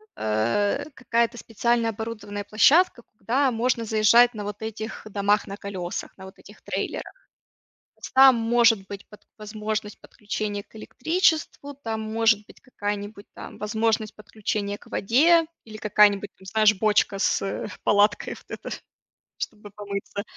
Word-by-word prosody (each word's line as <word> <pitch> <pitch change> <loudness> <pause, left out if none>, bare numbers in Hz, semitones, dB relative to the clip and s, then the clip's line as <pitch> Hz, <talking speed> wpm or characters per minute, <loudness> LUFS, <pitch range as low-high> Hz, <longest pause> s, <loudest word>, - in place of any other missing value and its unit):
а, 115 - 0
какая-то 235 -1 0
специальная 230 +1 0
оборудованная 210 -2 -6
площадка, 285 +6 +4 0.2
куда 265 +4 +1
можно 235 0 0
заезжать 225 +3 +5
на 210 -2 -6
вот 205 +1 -6
этих 220 0 -6
домах 205 +1 +1
на 200 - -7
колесах, 190 -3 -6
на 190 - -12
вот 190 +1 -12
этих - - -16
трейлерах. - - -5 0.8
С - - -9
там 265 -1 +7
может 230 -3 +3
быть 200 0 -8
под 210 - -16
возможность 215 0 -5
подключения 205 -1 -5
к - - -19
электричеству, 310 - 0
там 225 -5 -5
может 220 -1 +1
быть - - -17
какая-нибудь 205 -3 -5
там - - -10
возможность 220 0 -1
подключения 205 -1 -4
к - - -20
воде, 320 - +3 0.2
или 220 -1 -10
какая-нибудь 205 -1 +3
там, 190 - -16
знаешь, 215 +1 +4
бочка 205 -1 +2
с, - - +1
э, 195 - -3 0.2
палаткой 205 0 +2
вот - - -16 0.2
эта, - - -8 0.7
чтобы 210 -2 -7
помыться. 200 0 -6
215 Hz, 140 wpm, -24 LUFS, 205-230 Hz, 0.8 s, там